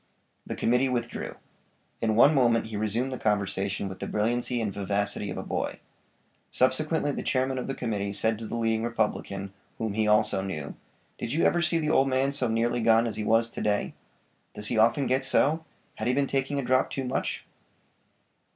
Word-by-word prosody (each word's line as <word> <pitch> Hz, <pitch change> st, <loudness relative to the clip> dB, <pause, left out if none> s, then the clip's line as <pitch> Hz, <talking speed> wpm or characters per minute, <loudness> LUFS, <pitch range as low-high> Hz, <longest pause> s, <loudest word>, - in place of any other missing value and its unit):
The -, -, -4 dB
committee 125 Hz, +3 st, +2 dB
withdrew. 120 Hz, -2 st, -3 dB, 0.7 s
In 110 Hz, -1 st, +1 dB
one 135 Hz, +7 st, +7 dB
moment 120 Hz, -5 st, +3 dB
he 110 Hz, -1 st, -7 dB
resumed 110 Hz, +5 st, -1 dB
the 130 Hz, -, -5 dB
conversation 100 Hz, -2 st, -1 dB
with 95 Hz, -1 st, -8 dB
the -, -, -4 dB
brilliancy 120 Hz, +3 st, 0 dB
and 105 Hz, -4 st, -2 dB
vivacity 100 Hz, +1 st, -1 dB
of -, -, -5 dB
a -, -, -4 dB
boy. -, -, -3 dB, 0.7 s
Subsequently 145 Hz, +4 st, +1 dB
the -, -, -4 dB
chairman 130 Hz, 0 st, 0 dB
of -, -, -4 dB
the 135 Hz, -, -3 dB
committee 105 Hz, -4 st, -2 dB
said 110 Hz, +2 st, 0 dB
to 115 Hz, -, -6 dB
the -, -, -4 dB
leading 115 Hz, -1 st, 0 dB
Republican, 105 Hz, -4 st, -2 dB, 0.2 s
whom 110 Hz, -2 st, -2 dB
he 110 Hz, 0 st, +1 dB
also 105 Hz, -2 st, +3 dB
knew: 80 Hz, -7 st, -5 dB, 0.5 s
"Did 115 Hz, -, -3 dB
you 160 Hz, -, +1 dB
ever 175 Hz, -, +3 dB
see 165 Hz, 0 st, +3 dB
the 155 Hz, -2 st, 0 dB
old 135 Hz, 0 st, +4 dB
man 135 Hz, +1 st, +1 dB
so 140 Hz, -3 st, 0 dB
nearly 115 Hz, +1 st, 0 dB
gone 115 Hz, +1 st, +4 dB
as 115 Hz, -3 st, -3 dB
he 110 Hz, -, -3 dB
was 115 Hz, +2 st, +3 dB
to -, -, -6 dB
day? 105 Hz, -1 st, 0 dB, 0.6 s
Does 105 Hz, -, -2 dB
he 120 Hz, -, 0 dB
often 115 Hz, +5 st, +4 dB
get 130 Hz, +1 st, +1 dB
so? 160 Hz, +3 st, +2 dB, 0.3 s
Had 110 Hz, -, -2 dB
he 125 Hz, -, +2 dB
been 140 Hz, 0 st, +2 dB
taking 135 Hz, +1 st, -1 dB
a 140 Hz, -, -1 dB
drop 130 Hz, +1 st, +2 dB
too 135 Hz, -, -3 dB
much?" 130 Hz, +1 st, -3 dB
115 Hz, 195 wpm, -27 LUFS, 105-130 Hz, 0.7 s, one